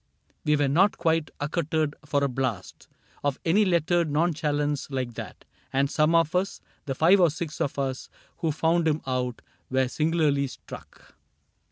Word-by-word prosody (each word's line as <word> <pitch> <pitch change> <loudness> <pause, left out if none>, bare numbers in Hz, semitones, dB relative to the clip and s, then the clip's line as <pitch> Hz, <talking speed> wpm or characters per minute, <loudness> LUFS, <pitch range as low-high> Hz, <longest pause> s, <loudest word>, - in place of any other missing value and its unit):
We 150 - +3
were 145 -1 +2
not 180 +9 +3
quite 165 -2 +1
accoutred 155 0 -1
for 145 -1 +1
a - - +3
blast 125 -7 -4 0.4
Of 145 -1 0
any 200 +6 +4
lettered 170 -2 +2
nonchalance 150 -2 0
like 130 -3 -3
that. - - -9 0.3
And 135 +1 +1
some 155 +2 +3
of 165 0 +3
us 185 +2 0
— - - -38
the 135 - -2
five 175 +8 +5
or 175 - +6
six 155 0 -5
of 140 - -1
us 135 -2 -3 0.3
Who 165 -2 0
found 160 +2 +1
him 155 0 +1
out 125 -2 -2
— - - -42
were 130 0 +2
singularly 150 -1 +1
struck. 130 - -12
150 Hz, 170 wpm, -26 LUFS, 140-165 Hz, 0.4 s, or